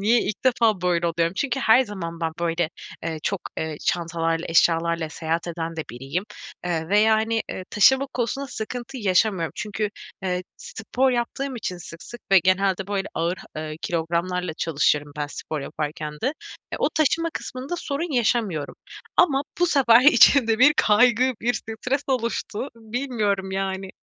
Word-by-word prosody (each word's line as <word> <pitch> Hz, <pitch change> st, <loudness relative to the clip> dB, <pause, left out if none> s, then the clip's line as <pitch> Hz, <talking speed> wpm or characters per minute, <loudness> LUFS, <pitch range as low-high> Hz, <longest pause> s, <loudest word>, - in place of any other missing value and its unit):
niye 225 Hz, +4 st, +4 dB
ilk 210 Hz, -, -4 dB
defa 230 Hz, -6 st, +3 dB
böyle 175 Hz, -1 st, +1 dB
oluyorum? 170 Hz, +1 st, 0 dB
Çünkü 270 Hz, -1 st, -1 dB
her 225 Hz, +2 st, +6 dB
zaman 170 Hz, -6 st, -6 dB
ben 165 Hz, -1 st, -1 dB
böyle, 170 Hz, -1 st, 0 dB, 0.3 s
eee, 160 Hz, -1 st, -3 dB
çok, 200 Hz, -2 st, -1 dB, 0.2 s
eee, 160 Hz, -1 st, -3 dB
çantalarla 165 Hz, -1 st, -1 dB
eşyalarla 165 Hz, 0 st, +2 dB
seyahat 165 Hz, +2 st, -3 dB
eden 165 Hz, -1 st, -4 dB
de 160 Hz, -, -2 dB
biriyim 135 Hz, -, -4 dB, 0.4 s
veya 200 Hz, +6 st, +3 dB
hani, 225 Hz, +1 st, 0 dB
eee, 185 Hz, -, -6 dB
taşıma 265 Hz, +6 st, +5 dB
konusunda 255 Hz, +3 st, -2 dB
sıkıntı 245 Hz, +1 st, -6 dB
yaşamıyorum. 190 Hz, -4 st, +1 dB
Çünkü, 210 Hz, 0 st, -3 dB, 0.3 s
eee, 180 Hz, -1 st, -1 dB
spor 255 Hz, +4 st, -1 dB
yaptığım 250 Hz, +2 st, -2 dB
için 185 Hz, -5 st, -4 dB
sık 165 Hz, -1 st, -10 dB
sık 240 Hz, +7 st, -10 dB
ve 195 Hz, -, +9 dB
genelde 185 Hz, +1 st, +1 dB
böyle 200 Hz, -1 st, -2 dB
ağır, 170 Hz, +2 st, -1 dB, 0.2 s
eee, 155 Hz, 0 st, -5 dB
kilogramlarla 170 Hz, +1 st, -1 dB
çalışıyorum 150 Hz, -2 st, +1 dB
ben 150 Hz, -, -2 dB
spor 150 Hz, +1 st, -5 dB
yaparken 150 Hz, +1 st, -4 dB
de. -, -, +1 dB, 0.5 s
Eee, -, -, -3 dB
o -, -, +2 dB
taşıma 330 Hz, +2 st, +2 dB
kısmında 260 Hz, +6 st, -5 dB
sorun 305 Hz, 0 st, -3 dB
yaşamıyorum 220 Hz, -, 0 dB, 0.4 s
ama 285 Hz, -6 st, +4 dB, 0.2 s
bu 355 Hz, -, +5 dB
sefer 255 Hz, -7 st, +5 dB
içimde 255 Hz, -4 st, +6 dB
bir 290 Hz, +4 st, +7 dB
kaygı, 245 Hz, +4 st, +4 dB
bir 245 Hz, +1 st, +1 dB
stres 250 Hz, +6 st, -3 dB
oluştu 235 Hz, -1 st, -2 dB
bilmiyorum, 220 Hz, -4 st, -2 dB
yani. 190 Hz, 0 st, -3 dB
200 Hz, 150 wpm, -24 LUFS, 170-240 Hz, 0.5 s, ve